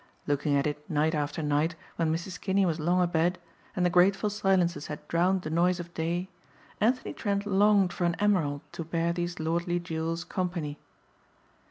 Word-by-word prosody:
Looking 145 Hz, 0 st, +1 dB
at 140 Hz, -, +2 dB
it 150 Hz, 0 st, -4 dB
night 155 Hz, +1 st, +1 dB
after 150 Hz, +1 st, -2 dB
night 150 Hz, +3 st, +1 dB, 0.2 s
when 165 Hz, -2 st, +1 dB
Mrs. 170 Hz, +3 st, -4 dB
Kinney 195 Hz, 0 st, +2 dB
was 165 Hz, -2 st, 0 dB
long 175 Hz, +3 st, +2 dB
abed 175 Hz, +1 st, +1 dB, 0.4 s
and 180 Hz, -, +1 dB
the -, -, +4 dB
grateful 190 Hz, +4 st, +4 dB
silences 190 Hz, -6 st, +1 dB
had 150 Hz, -, -7 dB
drowned 180 Hz, +2 st, +2 dB
the 155 Hz, -, -4 dB
noise 175 Hz, +2 st, +2 dB
of 175 Hz, 0 st, -8 dB
day, 170 Hz, +3 st, -2 dB, 0.5 s
Anthony 245 Hz, +4 st, +1 dB
Trent 200 Hz, -2 st, -1 dB
longed 200 Hz, -2 st, +4 dB
for 175 Hz, -, -1 dB
an 170 Hz, -1 st, +1 dB
emerald 170 Hz, -9 st, +1 dB
to 165 Hz, -, -5 dB
bear 165 Hz, +1 st, 0 dB
these 175 Hz, 0 st, -3 dB
lordly 170 Hz, +2 st, 0 dB
jewels 165 Hz, 0 st, -3 dB
company. 175 Hz, -5 st, -3 dB
175 Hz, 175 wpm, -28 LUFS, 160-185 Hz, 0.5 s, the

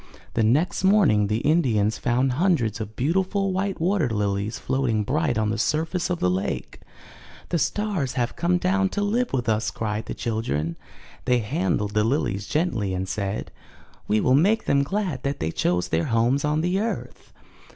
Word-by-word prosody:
'' -, -, -26 dB
The 115 Hz, -, +1 dB
next 140 Hz, -, +2 dB
morning 190 Hz, -, +4 dB
the 110 Hz, +3 st, -1 dB
Indians 120 Hz, -10 st, +2 dB
found 130 Hz, +2 st, +1 dB
hundreds 125 Hz, -, +1 dB
of 110 Hz, 0 st, -6 dB
beautiful 190 Hz, -, 0 dB
white 195 Hz, +1 st, -2 dB
water 175 Hz, -4 st, +1 dB
lilies 105 Hz, 0 st, -1 dB
floating 120 Hz, -5 st, 0 dB
bright 145 Hz, +2 st, 0 dB
on 110 Hz, -1 st, +1 dB
the 110 Hz, -, -2 dB
surface 160 Hz, +8 st, 0 dB
of 180 Hz, -, 0 dB
the -, -, +2 dB
lake. 90 Hz, +2 st, -2 dB, 0.7 s
'The 170 Hz, -, 0 dB
stars 195 Hz, -, -1 dB
have 120 Hz, -2 st, -1 dB
come 175 Hz, +1 st, +1 dB
down 190 Hz, +2 st, +1 dB
to 205 Hz, -, -2 dB
live 235 Hz, +4 st, 0 dB
with 125 Hz, -3 st, -1 dB
us!" 110 Hz, 0 st, +1 dB
cried 110 Hz, 0 st, -3 dB
the -, -, -4 dB
children. 85 Hz, -9 st, -2 dB, 0.5 s
They 125 Hz, -, +3 dB
handled 105 Hz, -, -1 dB
the 105 Hz, -, +2 dB
lilies 105 Hz, -5 st, -1 dB
gently 120 Hz, -, 0 dB
and 95 Hz, +1 st, -3 dB
said: 100 Hz, +1 st, -3 dB, 0.6 s
"We 105 Hz, +1 st, +2 dB
will 125 Hz, -, +3 dB
make 195 Hz, +11 st, +3 dB
them 140 Hz, -, +3 dB
glad 170 Hz, -2 st, -2 dB
that 140 Hz, +1 st, -2 dB
they 80 Hz, +1 st, -1 dB
chose 90 Hz, +1 st, 0 dB
their 80 Hz, 0 st, +1 dB
homes 120 Hz, +4 st, +1 dB
on 150 Hz, +1 st, +1 dB
the 180 Hz, +3 st, 0 dB
earth." 225 Hz, +2 st, -4 dB
125 Hz, 180 wpm, -24 LUFS, 105-175 Hz, 0.7 s, morning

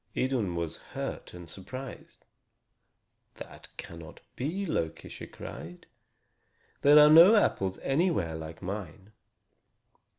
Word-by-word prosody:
Idun 120 Hz, -9 st, 0 dB
was 85 Hz, -1 st, -3 dB
hurt -, -, -7 dB
and 90 Hz, -1 st, -11 dB
surprised. 125 Hz, +10 st, -9 dB, 1.1 s
"That -, -, -11 dB
cannot 85 Hz, -2 st, -10 dB
be, 170 Hz, +10 st, -3 dB
Loki," 80 Hz, -, -3 dB
she -, -, -9 dB
cried. 90 Hz, +2 st, -10 dB, 1.0 s
"There 145 Hz, +1 st, +7 dB
are 150 Hz, 0 st, +9 dB
no 170 Hz, +7 st, +9 dB
apples 95 Hz, -, +1 dB
anywhere 135 Hz, -, +1 dB
like 80 Hz, 0 st, -8 dB
mine. 95 Hz, +1 st, -7 dB
100 Hz, 105 wpm, -29 LUFS, -, 1.1 s, are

